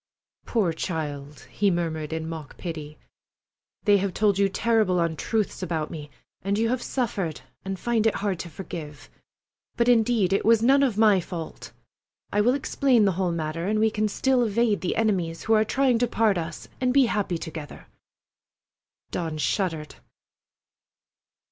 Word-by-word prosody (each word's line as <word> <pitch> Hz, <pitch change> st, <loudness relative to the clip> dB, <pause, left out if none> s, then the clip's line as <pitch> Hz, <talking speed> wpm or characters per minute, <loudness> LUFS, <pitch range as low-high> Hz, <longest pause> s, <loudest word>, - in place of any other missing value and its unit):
"Poor 200 Hz, -8 st, +1 dB
child!" 150 Hz, -4 st, -4 dB
he 205 Hz, -, +2 dB
murmured 165 Hz, -4 st, -2 dB
in 160 Hz, 0 st, -3 dB
mock 160 Hz, -3 st, -7 dB
pity. 155 Hz, -3 st, -6 dB, 0.9 s
"They 205 Hz, -2 st, +5 dB
have 195 Hz, -1 st, -2 dB
told 205 Hz, -2 st, +2 dB
you 200 Hz, -1 st, +3 dB
terrible 215 Hz, -3 st, +2 dB
untruths 170 Hz, +7 st, -1 dB
about 160 Hz, -4 st, -2 dB
me, 150 Hz, -2 st, -7 dB, 0.3 s
and 200 Hz, +1 st, -1 dB
you 225 Hz, +1 st, +1 dB
have 250 Hz, 0 st, 0 dB
suffered 200 Hz, -, -2 dB, 0.2 s
and 195 Hz, 0 st, -4 dB
find 225 Hz, +1 st, +1 dB
it 225 Hz, -, +1 dB
hard 195 Hz, -4 st, -2 dB
to 170 Hz, -, -6 dB
forgive. 155 Hz, -3 st, -8 dB, 0.7 s
But, 235 Hz, -, +2 dB
indeed, 225 Hz, -5 st, +3 dB
it 195 Hz, -, +1 dB
was 225 Hz, 0 st, +4 dB
none 275 Hz, +3 st, +5 dB
of 250 Hz, -7 st, +1 dB
my 215 Hz, -3 st, +5 dB
fault. 170 Hz, -2 st, -7 dB, 0.6 s
I 205 Hz, -, +3 dB
will 245 Hz, +5 st, +3 dB
explain 265 Hz, -4 st, +2 dB
the 195 Hz, -, +3 dB
whole 180 Hz, 0 st, -1 dB
matter, 165 Hz, +1 st, -3 dB
and 215 Hz, +1 st, +1 dB
we 220 Hz, 0 st, +3 dB
can 215 Hz, 0 st, 0 dB
still 255 Hz, +5 st, +1 dB
evade 225 Hz, -1 st, +1 dB
the 180 Hz, -, -1 dB
enemies 185 Hz, -7 st, 0 dB
who 225 Hz, -, +2 dB
are 215 Hz, 0 st, +5 dB
trying 255 Hz, +1 st, +2 dB
to 245 Hz, -, +2 dB
part 220 Hz, -3 st, +2 dB
us, 165 Hz, -1 st, -6 dB
and 255 Hz, -1 st, +2 dB
be 270 Hz, 0 st, +5 dB
happy 205 Hz, -6 st, -1 dB
together." 160 Hz, -3 st, -8 dB, 1.3 s
Dawn 160 Hz, -3 st, -3 dB
shuddered! 160 Hz, -2 st, -2 dB
195 Hz, 160 wpm, -25 LUFS, 165-225 Hz, 1.3 s, They